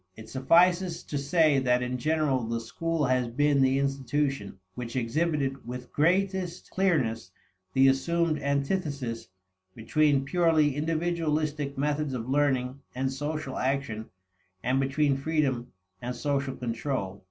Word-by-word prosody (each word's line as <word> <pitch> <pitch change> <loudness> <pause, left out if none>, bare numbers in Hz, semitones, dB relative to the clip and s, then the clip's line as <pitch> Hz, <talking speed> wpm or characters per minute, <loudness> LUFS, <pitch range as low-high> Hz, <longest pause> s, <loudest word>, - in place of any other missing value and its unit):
It 110 0 -11
suffices 170 +7 +3
to 145 - -4
say 150 0 +3
that 125 -1 +2
in 125 0 -3
general 150 -3 +1
the 115 +1 -2
school 165 +6 -2
has 125 -1 +1
been 140 +3 +2
the 135 0 +3
institution 135 -5 -1 0.2
which 120 +1 -6
exhibited 135 +2 0
with 125 0 -7
greatest 185 +2 0
clearness 130 - +1 0.4
the 135 0 +5
assumed 160 +4 +1
antithesis 140 - -2 0.5
between 140 +4 +2
purely 160 -3 +3
individualistic 155 -2 -1
methods 145 -1 -1
of 115 -1 -4
learning 135 -2 +1 0.2
and 130 +1 -1
social 145 0 -4
action, 130 -5 -2 0.5
and 130 +2 +1
between 135 +1 +1
freedom 135 -4 0 0.3
and 125 +1 -4
social 140 0 -1
control. 115 -5 -3
140 Hz, 125 wpm, -28 LUFS, 125-155 Hz, 0.5 s, the